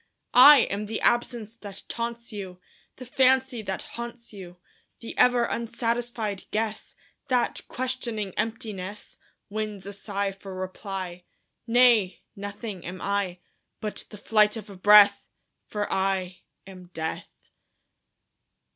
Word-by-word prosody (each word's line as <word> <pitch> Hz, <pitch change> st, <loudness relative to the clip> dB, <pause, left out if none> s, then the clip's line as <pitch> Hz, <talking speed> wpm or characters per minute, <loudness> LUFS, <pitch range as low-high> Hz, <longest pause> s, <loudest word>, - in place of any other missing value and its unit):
I 275 Hz, +2 st, +10 dB
am 205 Hz, +1 st, -2 dB
the 220 Hz, +1 st, -3 dB
absence 240 Hz, -2 st, +1 dB
that 200 Hz, -3 st, -10 dB
taunts 235 Hz, 0 st, -5 dB
you, 190 Hz, -3 st, -7 dB, 0.4 s
The 255 Hz, -, -10 dB
fancy 260 Hz, -1 st, +2 dB
that 195 Hz, -2 st, -4 dB
haunts 235 Hz, -1 st, -8 dB
you; 180 Hz, -3 st, -10 dB, 0.4 s
The 230 Hz, -, -8 dB
ever 245 Hz, -1 st, +4 dB
unsatisfied 230 Hz, -3 st, -2 dB
guess 215 Hz, 0 st, -3 dB, 0.3 s
That, 250 Hz, -3 st, +1 dB
questioning 240 Hz, -6 st, -3 dB
emptiness, 210 Hz, -3 st, -5 dB, 0.3 s
Wins 210 Hz, -2 st, -4 dB
a 200 Hz, -, -7 dB
sigh 200 Hz, 0 st, -3 dB
for 195 Hz, 0 st, -10 dB
reply. 185 Hz, -1 st, -6 dB, 0.4 s
Nay; 230 Hz, -5 st, +4 dB
nothing 205 Hz, -1 st, -6 dB
am 180 Hz, +1 st, -7 dB
I, 200 Hz, -3 st, -2 dB, 0.4 s
But 210 Hz, -1 st, -5 dB
the 210 Hz, -, -10 dB
flight 210 Hz, +1 st, +3 dB
of 215 Hz, -2 st, -9 dB
a -, -, -10 dB
breath 200 Hz, +1 st, +6 dB, 0.4 s
For 210 Hz, -1 st, -2 dB
I 190 Hz, -1 st, -1 dB, 0.3 s
am 185 Hz, -2 st, -12 dB
Death! 160 Hz, 0 st, -4 dB
210 Hz, 120 wpm, -26 LUFS, 195-235 Hz, 0.4 s, I